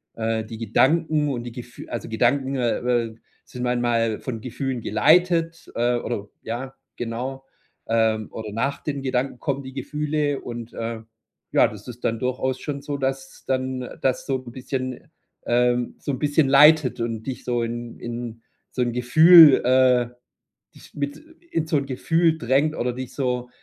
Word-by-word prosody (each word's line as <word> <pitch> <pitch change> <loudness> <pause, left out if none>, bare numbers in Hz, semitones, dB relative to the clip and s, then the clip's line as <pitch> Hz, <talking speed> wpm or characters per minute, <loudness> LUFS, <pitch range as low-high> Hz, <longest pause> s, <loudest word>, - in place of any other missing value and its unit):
äh, 110 -1 -1
die 110 0 -8
Gedanken 150 +7 +2
und 120 -3 -3
die 120 - -7
Gef 120 +1 -10
also, 120 - -5
Gedanken, 130 +4 +1
äh, 120 -3 +1 0.3
äh, 110 - -14 0.3
sind 125 0 -7
manchmal 120 -2 0
von 120 -4 -4
Gefühlen 125 +1 -3
geleitet, 165 - +2
äh, 120 +1 +2
oder 105 -4 -4
ja, 125 +4 -5 0.2
genau. 125 +3 -4 0.4
Ähm, 110 -1 +1
oder 110 -2 -7
nach 140 +5 -1
den 140 -2 -3
Gedanken 130 -1 -2
kommen 140 -1 -2
die 130 0 -9
Gefühle 150 +1 -2
und, 120 -1 -7
äh, 115 -1 -4 0.5
ja, - - +5
das 105 -1 -11
ist 120 0 -8
dann 115 - +1
durchaus 130 +1 -1
schon 140 -2 -4
so, 145 0 -4
dass 135 0 -4
dann 130 -1 -2
das 130 -1 0
so 135 -2 0
'n 125 -2 -10
bisschen 130 -1 -5 0.4
ähm, 120 0 +1
so 145 - -3
'n 130 - -4
bisschen 145 -1 +2
leitet 140 -2 +6
und 115 -1 -3
dich 130 - -5
so 120 -1 -1
in 120 0 -5
in 120 -1 -6 0.3
so 125 - -2
'n 120 -1 -1
Gefühl, 155 +5 +8
äh 125 -1 +4 0.7
dich - - -16
mit 145 0 -3 0.4
in 160 -1 0
so 155 - +1
'n 140 - -3
Gefühl 160 +5 +1
drängt, 140 +4 +1
oder 125 0 -1
dich 130 0 -7
so, 125 -2 -2
125 Hz, 170 wpm, -23 LUFS, 120-140 Hz, 0.7 s, Gefühl